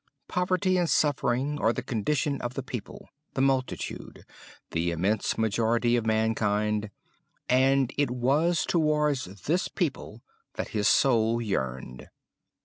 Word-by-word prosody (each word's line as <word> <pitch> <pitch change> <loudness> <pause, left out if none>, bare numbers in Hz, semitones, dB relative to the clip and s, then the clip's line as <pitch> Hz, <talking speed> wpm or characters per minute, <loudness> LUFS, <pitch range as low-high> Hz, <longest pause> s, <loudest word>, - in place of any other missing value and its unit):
Poverty 185 +1 +1
and 175 -2 +1
suffering 145 0 +1
are 110 - +3
the 115 - -4
condition 140 +5 -1
of 120 +1 -4
the 135 - -3
people, 125 -4 -8 0.3
the 130 - 0
multitude, 135 -1 -2 0.5
the 85 +1 0
immense 95 +6 0
majority 115 +2 +1
of 115 -2 -1
mankind; 105 -1 +1 0.6
and 130 0 +3
it 145 -3 +2
was 140 +8 +1
towards 150 -4 +1 0.2
this 175 +5 +1
people 135 - -4 0.3
that - - -4
his 105 -2 0
soul 115 -3 +3
yearned. 65 - -4
125 Hz, 125 wpm, -27 LUFS, 110-145 Hz, 0.6 s, are